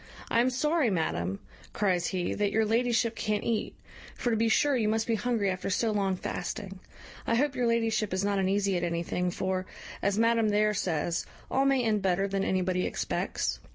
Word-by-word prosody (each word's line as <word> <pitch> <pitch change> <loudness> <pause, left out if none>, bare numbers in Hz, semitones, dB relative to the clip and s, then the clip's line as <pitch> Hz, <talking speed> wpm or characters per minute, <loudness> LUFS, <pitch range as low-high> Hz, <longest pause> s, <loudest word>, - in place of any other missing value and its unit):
"I 230 - +4
am 250 - +3
sorry, 300 +2 +1
madam," 95 - -1 0.4
cries 185 -4 +1
he, 180 -2 -1
"that 205 -1 0
your 220 +1 +2
ladyship 230 +1 +1
can't 210 -2 -1
eat; 230 -2 -1 0.4
for 240 - -1
to - - +2
be 225 +1 +2
sure 285 +5 +3
you 225 -4 +1
must 220 +1 +1
be 230 - 0
hungry 220 -3 0
after 185 +1 -3
so 220 +3 +1
long 195 -2 0
fasting. 195 +2 -5 0.5
I 230 - +2
hope 280 +3 +2
your 250 -1 +1
ladyship 225 -2 +1
is 185 +2 0
not 200 -1 +1
uneasy 195 0 +1
at 175 - -1
anything, 170 +1 -1
for, 185 +1 -2 0.3
as 200 0 +1
madam 230 -1 +3
there 210 +1 +2
says, 170 -3 -1 0.2
all 270 +1 +2
may 270 -2 +3
end 215 -3 +1
better 190 +1 +1
than 195 0 -1
anybody 185 -1 0
expects. - - -2
210 Hz, 190 wpm, -29 LUFS, 185-230 Hz, 0.5 s, I